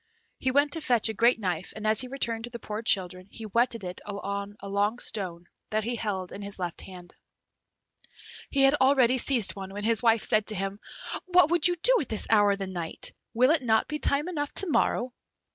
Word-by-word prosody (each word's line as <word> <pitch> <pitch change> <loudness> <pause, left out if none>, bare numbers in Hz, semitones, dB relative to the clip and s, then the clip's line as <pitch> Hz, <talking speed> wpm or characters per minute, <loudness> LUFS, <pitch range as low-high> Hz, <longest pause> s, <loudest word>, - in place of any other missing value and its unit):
He 260 - 0
went 285 +2 +2
to 325 - -2
fetch 240 -6 +2
a - - -2
great 235 +2 +3
knife, 180 -4 -3
and 215 - -7
as 215 +2 +3
he 255 - -5
returned 235 -4 -3
to - - -10
the 240 - -7
poor 215 -1 -6
children, 185 -4 0
he 225 - -10
whetted 230 +1 0
it 180 0 -6
on 200 0 -5
a 200 - -8
long 205 +3 0
stone 180 -7 -5 0.2
that 215 0 -1
he 240 +2 -2
held 195 -5 -4
in 200 - -8
his 200 0 -6
left 175 -3 -5
hand. 180 -2 -12 1.4
He 275 -1 +2
had 270 +1 +6
already 260 -2 +4
seized 240 -6 +2
one, 195 -1 -7
when 205 +1 -6
his 225 0 +3
wife 230 -2 +3
said 215 -1 +2
to 215 - 0
him, 195 +1 -4 0.5
"What 360 -2 +4
would 345 -1 +4
you 355 - 0
do - - +6
at - - -6
this 220 - -3
hour 205 -2 +5
of - - -4
the 195 - -4
night? 175 -3 -3 0.2
will 255 +4 +4
it 320 -3 +3
not 220 -3 +2
be 300 0 -4
time 290 +3 +1
enough 290 -5 -3
to 390 - +4
morrow?" 255 -5 0
220 Hz, 225 wpm, -27 LUFS, 200-255 Hz, 1.4 s, had